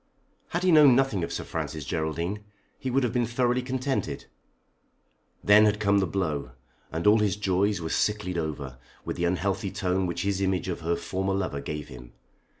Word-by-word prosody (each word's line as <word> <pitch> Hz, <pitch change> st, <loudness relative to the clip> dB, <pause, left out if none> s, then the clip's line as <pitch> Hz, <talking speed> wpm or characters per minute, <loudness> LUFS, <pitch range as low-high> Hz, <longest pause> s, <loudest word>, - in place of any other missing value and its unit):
Had 175 Hz, +1 st, -2 dB
he 185 Hz, -, +4 dB
known 150 Hz, -5 st, +7 dB
nothing 125 Hz, -9 st, +1 dB
of -, -, -3 dB
Sir -, -, -3 dB
Francis 75 Hz, -3 st, -5 dB
Geraldine 85 Hz, +7 st, -2 dB, 0.4 s
he 130 Hz, -, -3 dB
would 135 Hz, +2 st, +2 dB
have 120 Hz, -2 st, 0 dB
been 120 Hz, -2 st, +1 dB
thoroughly 125 Hz, +1 st, +1 dB
contented. 130 Hz, +1 st, -2 dB, 1.2 s
Then 105 Hz, +1 st, +7 dB
had 105 Hz, 0 st, +2 dB
come 100 Hz, -1 st, +3 dB
the 95 Hz, -, +1 dB
blow, 75 Hz, -9 st, -2 dB, 0.4 s
and 80 Hz, +1 st, -3 dB
all 105 Hz, +2 st, +6 dB
his 105 Hz, -3 st, +1 dB
joys 100 Hz, -1 st, +1 dB
were 80 Hz, -1 st, -4 dB
"sicklied 105 Hz, -2 st, 0 dB
over" 75 Hz, -5 st, -4 dB, 0.3 s
with -, -, -3 dB
the 85 Hz, -, -1 dB
unhealthy 95 Hz, +2 st, -1 dB
tone 95 Hz, -1 st, -1 dB
which 85 Hz, 0 st, -3 dB
his 100 Hz, -1 st, -1 dB
image 95 Hz, -1 st, 0 dB
of 90 Hz, -, -3 dB
her 85 Hz, +1 st, 0 dB
former 95 Hz, +2 st, -2 dB
lover 90 Hz, -8 st, -2 dB
gave 75 Hz, +1 st, -5 dB
him. 60 Hz, -2 st, -12 dB
95 Hz, 185 wpm, -27 LUFS, 85-105 Hz, 1.2 s, known